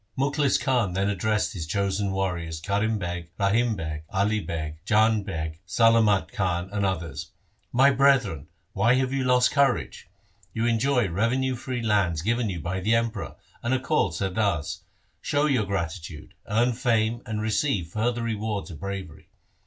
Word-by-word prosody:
Mukhlis 140 Hz, +1 st, +2 dB
Khan 125 Hz, -9 st, +1 dB
then 100 Hz, +2 st, +1 dB
addressed 105 Hz, +2 st, 0 dB
his 80 Hz, -5 st, -5 dB
chosen 100 Hz, +2 st, 0 dB
warriors 90 Hz, -4 st, -2 dB
Karim 100 Hz, +5 st, 0 dB
Beg, 85 Hz, -3 st, -5 dB
Rahim 110 Hz, +3 st, +2 dB
Beg, 80 Hz, -3 st, -5 dB
Ali 105 Hz, +3 st, +1 dB
Beg, 80 Hz, -5 st, -5 dB
Jang 110 Hz, +1 st, +3 dB
Beg, 80 Hz, -4 st, -5 dB
Salamat 110 Hz, -1 st, +3 dB
Khan, 90 Hz, -1 st, -1 dB
and 100 Hz, -1 st, -1 dB
others: 85 Hz, -5 st, -3 dB, 0.2 s
' -, -, -43 dB
My 140 Hz, +1 st, +7 dB
brethren, 130 Hz, -, +2 dB, 0.3 s
why 115 Hz, +6 st, +3 dB
have 130 Hz, 0 st, 0 dB
you 135 Hz, -1 st, 0 dB
lost 125 Hz, 0 st, +4 dB
courage? 140 Hz, -, 0 dB, 0.5 s
You 115 Hz, +1 st, 0 dB
enjoy 120 Hz, 0 st, +2 dB
revenue 120 Hz, +8 st, 0 dB
free 125 Hz, 0 st, -4 dB
lands 95 Hz, -7 st, +1 dB
given 115 Hz, +2 st, 0 dB
you 90 Hz, -3 st, -4 dB
by 90 Hz, +3 st, -3 dB
the 110 Hz, +5 st, +2 dB
Emperor, 115 Hz, -3 st, -2 dB, 0.3 s
and 120 Hz, +2 st, +1 dB
are -, -, 0 dB
called 125 Hz, -, +1 dB
Sardars. 95 Hz, -4 st, -1 dB, 0.4 s
Show 145 Hz, +1 st, +1 dB
your 130 Hz, -8 st, +2 dB
gratitude, 85 Hz, -4 st, -4 dB, 0.2 s
earn 120 Hz, +4 st, +2 dB
fame 115 Hz, -2 st, +1 dB
and 110 Hz, -1 st, -3 dB
receive 110 Hz, -, 0 dB
further 115 Hz, +5 st, -1 dB
rewards 110 Hz, -3 st, -3 dB
of 75 Hz, -, -9 dB
bravery. 95 Hz, -4 st, -7 dB
105 Hz, 160 wpm, -26 LUFS, 90-120 Hz, 0.5 s, My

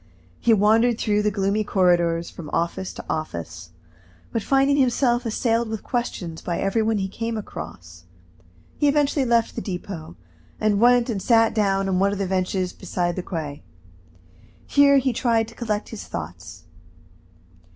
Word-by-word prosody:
He 235 Hz, -, +2 dB
wandered 220 Hz, +3 st, +4 dB
through 210 Hz, -2 st, +1 dB
the 210 Hz, -, +2 dB
gloomy 200 Hz, +1 st, 0 dB
corridors, 175 Hz, -4 st, +2 dB
from 155 Hz, -4 st, -9 dB
office 170 Hz, +3 st, -2 dB
to -, -, -9 dB
office, 85 Hz, -, -5 dB, 0.6 s
but 230 Hz, -, -1 dB
finding 275 Hz, +4 st, +3 dB
himself 245 Hz, -2 st, +2 dB
assailed 230 Hz, 0 st, 0 dB
with 220 Hz, -1 st, -5 dB
questions 185 Hz, -9 st, -3 dB
by 170 Hz, -1 st, -3 dB
every 195 Hz, +3 st, 0 dB
one 220 Hz, 0 st, +1 dB
he 190 Hz, -1 st, -1 dB
came 225 Hz, +3 st, -4 dB
across, 85 Hz, -, -9 dB, 0.7 s
he 295 Hz, -, +3 dB
eventually 285 Hz, -1 st, +2 dB
left 235 Hz, -1 st, +2 dB
the 230 Hz, -, -4 dB
Depot, 180 Hz, -4 st, -6 dB, 0.4 s
and 210 Hz, -2 st, +2 dB
went 245 Hz, 0 st, +5 dB
and 215 Hz, -6 st, -2 dB
sat 225 Hz, 0 st, +4 dB
down 195 Hz, -3 st, +1 dB
on 185 Hz, -1 st, +1 dB
one 200 Hz, +1 st, +3 dB
of 205 Hz, -, -3 dB
the 195 Hz, -, -1 dB
benches 185 Hz, 0 st, -1 dB
beside 175 Hz, -1 st, -2 dB
the 185 Hz, -, -2 dB
quay. 155 Hz, -5 st, -5 dB, 1.0 s
Here 285 Hz, -1 st, +5 dB
he 260 Hz, -2 st, +1 dB
tried 230 Hz, -2 st, +1 dB
to -, -, -14 dB
collect 215 Hz, -3 st, -3 dB
his 225 Hz, -, -8 dB
thoughts. 90 Hz, +2 st, -8 dB
205 Hz, 160 wpm, -23 LUFS, 175-235 Hz, 1.0 s, went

